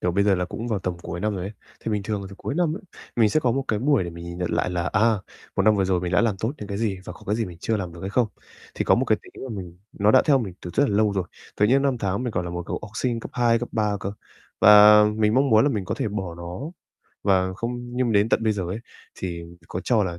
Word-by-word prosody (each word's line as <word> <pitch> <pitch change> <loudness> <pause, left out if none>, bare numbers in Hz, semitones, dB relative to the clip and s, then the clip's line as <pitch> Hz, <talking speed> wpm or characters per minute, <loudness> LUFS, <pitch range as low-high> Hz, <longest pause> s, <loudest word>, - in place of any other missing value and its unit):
kiểu, 90 - +1
bây 100 +3 +2
giờ 100 -1 +4
là 90 -1 0
cũng 115 +6 -6
vào 110 - 0
tầm 90 -2 -3
cuối 85 - -5
năm 105 +1 0
rồi 90 -2 -4
ấy. 100 - -5 0.3
Thì - - -3
bình 105 -1 -1
thường 105 0 -2
là - - -7
tầm 95 - -12
cuối 140 - -4
năm 165 -2 +1
ấy, - - -9 0.3
mình 115 -3 +5
sẽ 155 - +2
có 125 -5 +2
một 135 +2 -1
cái 105 - +1
buổi 135 -3 +2
để 85 - -5
mình 85 0 -9
nhìn 85 0 -7
nhận 90 -1 -2
lại - - 0
là, 90 -1 -1
à, 110 +3 +3 0.4
một - - +3
năm 105 +1 +4
vừa 95 - +2
rồi 95 -1 +1
mình 90 0 -3
đã - - +4
làm 115 -4 +1
tốt 110 +6 -2
những 105 - -7
cái 100 -1 -3
gì 105 -4 -1
và - - -7
có - - -15
cái 105 - +1
gì 115 - 0
mình 85 -4 -9
chưa 110 - 0
làm 90 -4 -4
được 85 - -11
hay 95 - -4
không. 120 +1 +2 0.5
Thì - - -1
có - - +5
một - - +1
cái - - +2
tính - - -12
là - - -6
mình 90 -4 -7
nó 105 +1 +3
đã 130 - +6
theo 145 -3 +4
mình 100 -8 -4
từ 90 - -6
rất 145 - +3
là 100 - 0
lâu 105 -1 +3
rồi, 95 -2 -1 0.3
từ 105 - +4
những 135 +5 +4
năm 135 -3 +1
tháng 100 +2 -1
mình 125 - -2
còn 90 - -1
là 85 - -5
một 85 0 -4
cậu - - -3
học 105 - -8
sinh 115 0 -1
cấp - - -8
2, 120 -1 +3
cấp 120 - -4
3 105 -2 +1
cơ, 100 - -3 0.5
và 105 +1 +9
mình 110 0 +2
mong 135 +1 +3
muốn 110 +2 +6
là 145 - +3
mình 105 -7 -2
có - - -2
thể - - -2
bỏ 95 -4 -4
nó 85 +3 -7 0.6
và 95 -2 +2
không 120 +3 -3 0.2
nhưng 125 -2 +1
đến 105 +1 +3
tận 115 - +2
bây 110 -1 +2
giờ 100 -3 -3
ấy, 95 +5 -3 0.4
thì 85 -2 -5 0.3
có 90 - -4
cho 110 -5 +3
là 85 -2 -4
105 Hz, 320 wpm, -24 LUFS, 95-115 Hz, 0.6 s, và